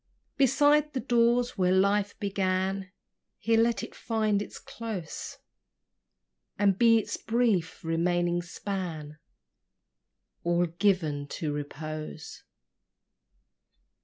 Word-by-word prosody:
Beside 290 +2 +4
the 265 - -1
doors 240 -1 +2
where 180 -1 +3
life 200 +2 +2
began 190 -1 -1 0.5
Here 225 0 +2
let 235 0 +1
it - - -7
find 215 -3 0
its - - -7
close; 215 -8 -6 1.2
And 200 -1 +3
be 230 +2 +5
its 220 - -2
brief, 220 -8 0
remaining 175 +1 +1
span 170 -5 -5 1.2
All 175 +1 +2
given 165 -5 0
to 150 +1 -3
repose. 155 +2 -6
190 Hz, 95 wpm, -28 LUFS, 170-225 Hz, 1.2 s, be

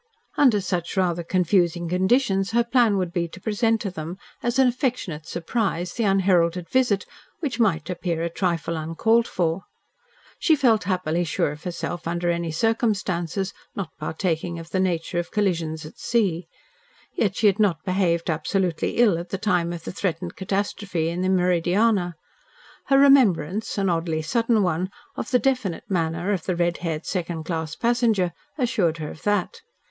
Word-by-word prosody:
Under 250 -8 +5
such 180 0 -3
rather 175 -2 +1
confusing 175 -1 +1
conditions 195 +2 +2
her 235 0 +4
plan 235 -4 +3
would 180 -2 -2
be 170 -2 0
to 175 - -12
present 225 +3 +1
to 200 - -3
them, 165 +1 -6 0.2
as 240 +1 -1
an 265 -1 +5
affectionate 240 - -2
surprise, 180 -1 -2
the 230 - -1
unheralded 180 -3 +2
visit, 240 -2 +2 0.3
which 270 -8 -3
might 195 -8 +2
appear 175 -2 -2
a - - +1
trifle 170 -2 -1
uncalled 220 +9 +2
for. 170 +1 -1 0.7
She 320 - +4
felt 240 -7 +3
happily 175 -3 0
sure 150 -3 0
of 150 +3 -11
herself 175 -1 -4
under 175 +1 0
any 170 -1 -2
circumstances 195 -2 0 0.2
not 185 -5 -4
partaking 165 +1 -2
of 165 0 -9
the 185 - 0
nature 175 -2 0
of 175 - -4
collisions 165 -7 -1
at 155 - -12
sea. 185 -8 0 0.7
Yet - - 0
she - - 0
had 205 0 +4
not 190 -7 +2
behaved 180 -3 +1
absolutely 170 +2 -1
ill 215 -8 +4
at 175 +1 -7
the 195 - -2
time 180 -4 +1
of 170 -2 -6
the - - -5
threatened 180 -3 -3
catastrophe 190 -3 -2
in 170 +2 -3
the 185 - +1
Meridiana. 180 +2 +2 0.7
Her 275 - +5
remembrance, 225 - +4
an 195 -1 +1
oddly 165 -2 0
sudden 230 +4 +2
one, 180 +1 0 0.3
of - - -4
the 255 - +4
definite 250 -10 0
manner 165 +1 0
of 180 -5 -3
the 185 - +1
red 175 0 +1
haired 165 -2 -3
second 170 -3 -3
class 160 -1 -3
passenger, 230 -7 +1 0.2
assured 220 - +1
her 155 -2 -5
of - - -12
that. 210 - -1
180 Hz, 165 wpm, -24 LUFS, 170-210 Hz, 0.7 s, Under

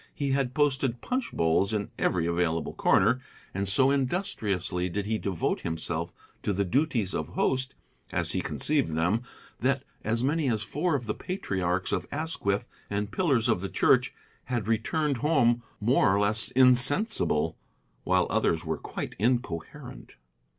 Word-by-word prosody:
He 140 -2 -1
had 135 -2 0
posted 135 -4 +1
punch 255 0 -3
bowls 85 +5 +1
in 105 -1 -2
every 85 -3 +1
available 85 -1 -1
corner, 130 - +3 0.3
and 100 +1 -2
so 130 +7 +4
industriously 105 - -1
did 100 +3 -3
he 110 +1 -1
devote 95 -4 -2
himself 80 +1 -2 0.3
to 105 - -1
the 100 +1 0
duties 120 - 0
of - - -2
host, 130 0 -1 0.4
as - - 0
he - - 0
conceived 140 - 0
them, 90 +8 +1 0.4
that 130 +2 0 0.2
as 115 +2 0
many 145 +1 +1
as 110 -2 0
four 150 - -1
of 125 -4 -3
the 110 - -1
patriarchs 95 - -2
of - - -1
Asquith 140 -10 -1 0.2
and 100 0 -2
pillars 135 -11 +1
of 110 -7 +1
the 95 - -4
church - - +3 0.3
had 120 -5 -2
returned 145 +5 0
home 120 -4 +2 0.2
more 105 -3 +3
or - - +2
less 105 +2 +3
insensible, 125 - +4 0.5
while - - +2
others 80 0 +1
were 80 -1 -2
quite - - -6
incoherent. 115 -8 -3
115 Hz, 150 wpm, -27 LUFS, 95-135 Hz, 0.5 s, so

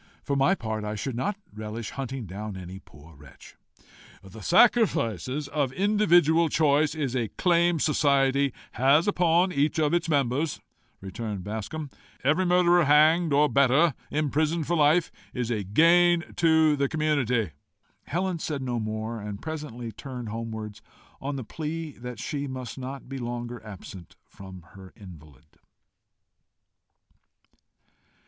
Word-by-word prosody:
For 140 - -1
my 140 +8 +3
part, 110 - -4
I 105 0 -4
should 130 +5 -4
not 200 - -2 0.2
relish 110 +1 -6
hunting 135 -2 -5
down 100 +2 -7
any 95 +1 -8
poor 80 -3 -17
wretch." 70 -2 -16 0.7
"The 95 +3 -12
sacrifice 175 - +3 0.2
of 140 -3 -1
individual 175 -5 +3
choice 150 0 +2
is 140 -5 -2
a 120 -3 0
claim 175 -1 +3
society 140 -2 +2 0.2
has 140 +7 +3
upon 180 -1 +2
each 145 0 0
of 155 -1 +1
its 170 -1 0
members," 140 +1 0 0.4
returned 100 0 -5
Bascombe. 110 - -5 0.3
"Every 155 +8 +2
murderer 175 -1 +4
hanged, 155 +3 +4
or 145 +2 +4
better, 140 +3 +3 0.2
imprisoned 155 +2 0
for 170 - 0
life, 155 +2 +3 0.2
is 125 -2 -2
a 105 -3 -1
gain 170 - +3
to 160 -2 +4
the 140 -1 0
community." 130 - 0 0.6
Helen 180 +1 -2
said 145 -4 -3
no 120 -2 -2
more, 110 +1 -4
and 105 -1 -6
presently 145 -7 -6
turned 125 -2 -7
homewards, 110 -1 -6 0.4
on 140 +1 -3
the 130 - -4
plea 160 +5 -5
that 125 -1 -7
she 140 +5 -4
must 130 -2 -6
not 135 +1 -7
be 135 +1 -6
longer 120 0 -5
absent 95 -4 -11
from 95 -2 -12
her 95 -1 -13
invalid. 75 -9 -14
140 Hz, 135 wpm, -26 LUFS, 110-160 Hz, 0.7 s, murderer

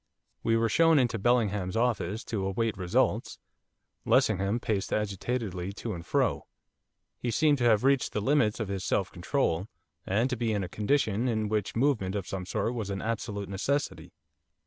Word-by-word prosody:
We 115 0 +2
were 115 0 +2
shown 165 +7 +4
into 120 -4 +2
Bellingham's 105 -4 +1
office 115 -2 0
to 105 -6 -3
await 110 +3 -1
results. 105 +5 0 0.7
Lessingham 100 +5 +2
paced 105 -4 -2
agitatedly 100 -2 -2
to 110 +2 -5
and 85 -2 -7
fro; - - 0 0.7
he 120 - -2
seemed 145 +4 +3
to 120 - +1
have 110 -2 +4
reached 135 -1 +3
the - - -1
limits 120 -2 +2
of 110 - -2
his 95 -1 -3
self 95 +1 0
control, 95 - -1 0.4
and 110 +6 +1
to - - +1
be 115 -2 -1
in 100 -2 -1
a - - -3
condition 110 +2 0
in 110 -3 0
which 105 -2 -1
movement 115 -7 +1
of 100 -3 -2
some 95 -2 -5
sort 115 - -1
was 110 -5 -4
an 95 -1 -3
absolute 105 -3 -3
necessity. 95 - -2
110 Hz, 170 wpm, -29 LUFS, 95-120 Hz, 0.7 s, shown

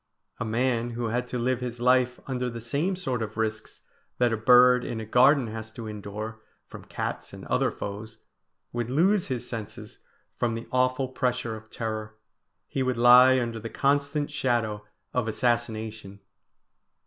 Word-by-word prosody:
A - - -2
man 120 +1 0
who 120 -1 -1
had 125 +2 -1
to 125 - -4
live 125 +1 0
his 120 -1 -5
life 125 0 +3
under 125 -2 -2
the 115 -1 -6
same 140 - -1
sort 130 -10 -2
of 110 0 -5
risks 110 0 -3 0.3
that 120 -2 +2
a - - +2
bird 125 +2 +6
in 115 - -4
a 110 - -5
garden 130 +4 +5
has 110 0 -6
to 115 0 -7
endure 105 +1 -6 0.2
from - - -12
cats - - -5
and - - -9
other - - +1
foes, 105 +2 -7 0.6
would 120 -1 -2
lose 180 +8 +2
his 130 -4 -3
senses 110 -3 -7 0.4
from 120 -2 0
the 115 +1 -7
awful 130 +1 +1
pressure 125 -2 -2
of 110 0 -12
terror; 110 -1 -5 0.5
he 135 - -3
would 130 -2 0
lie 125 +2 +7
under 115 -2 -3
the 115 +1 -6
constant 145 +2 0
shadow 115 -7 -1 0.3
of 125 -3 0
assassination. 110 -3 -2
120 Hz, 165 wpm, -27 LUFS, 110-130 Hz, 0.6 s, lie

